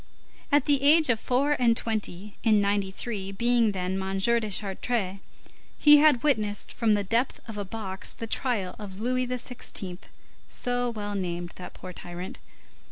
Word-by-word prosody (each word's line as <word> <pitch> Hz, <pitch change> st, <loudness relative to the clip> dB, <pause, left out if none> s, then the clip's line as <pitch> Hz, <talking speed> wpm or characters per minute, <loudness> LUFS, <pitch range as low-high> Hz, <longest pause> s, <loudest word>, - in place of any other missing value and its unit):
At 290 Hz, -2 st, +4 dB
the 285 Hz, -2 st, +3 dB
age 300 Hz, +1 st, +6 dB
of 225 Hz, -, 0 dB
four 265 Hz, +5 st, +1 dB
and 230 Hz, -2 st, +4 dB
twenty, 210 Hz, -3 st, -3 dB
in 215 Hz, -3 st, +4 dB
'93, 200 Hz, 0 st, -2 dB
being 235 Hz, +1 st, +3 dB
then 190 Hz, 0 st, -2 dB
M. 190 Hz, 0 st, -2 dB
de 230 Hz, +2 st, +2 dB
Chartres, 195 Hz, 0 st, -2 dB, 0.6 s
he 295 Hz, 0 st, +8 dB
had 290 Hz, -5 st, +5 dB
witnessed, 215 Hz, -8 st, 0 dB
from 225 Hz, -2 st, +2 dB
the 205 Hz, -1 st, +1 dB
depth 230 Hz, +6 st, 0 dB
of 225 Hz, -, -7 dB
a 205 Hz, -, -3 dB
box, 195 Hz, -2 st, -4 dB
the 230 Hz, -, -6 dB
trial 220 Hz, -5 st, -1 dB
of 195 Hz, -2 st, -8 dB
Louis 255 Hz, +2 st, 0 dB
XVI., 240 Hz, -7 st, -4 dB, 0.5 s
so 245 Hz, -1 st, -1 dB
well 205 Hz, -3 st, -4 dB
named 175 Hz, -3 st, -3 dB
that 180 Hz, -, -9 dB
poor 185 Hz, -, -9 dB
tyrant. 175 Hz, +1 st, -8 dB
215 Hz, 160 wpm, -27 LUFS, 190-245 Hz, 0.6 s, he